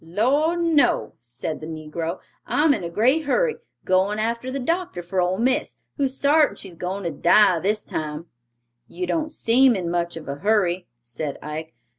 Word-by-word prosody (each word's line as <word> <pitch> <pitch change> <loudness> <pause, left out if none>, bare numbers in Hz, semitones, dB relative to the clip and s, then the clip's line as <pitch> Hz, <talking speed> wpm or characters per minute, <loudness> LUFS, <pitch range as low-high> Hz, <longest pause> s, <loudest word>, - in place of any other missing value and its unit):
"Lord, 280 - +1
no," 300 - +2
said 120 +7 -6
the 155 - -6
negro; 160 +2 -5 0.3
"I'm 300 0 +3
in 200 - -3
a 170 - -3
great 255 - +2
hurry; 470 - +1 0.3
goin' 190 +3 +2
arter 230 +3 -2
the 265 - -3
doctor 330 - -2
for 180 +2 -1
ole 180 +1 0
miss, 255 +4 0 0.2
who's 270 -2 0
sartin 295 +1 +4
she's 190 -3 -10
goin' 185 +4 -4
for 170 - -2
to - - -10
die 180 +2 +5
this 210 +4 0
time." 155 +1 -5 0.6
"You 365 - -4
don't 315 -3 -1
seem 250 0 +4
in 175 -3 -2
much 170 -1 -1
of 160 - -9
a 140 0 -4
hurry," 185 -1 +1 0.2
said 120 +5 -5
Ike. 155 0 -6
195 Hz, 180 wpm, -23 LUFS, 170-270 Hz, 0.6 s, die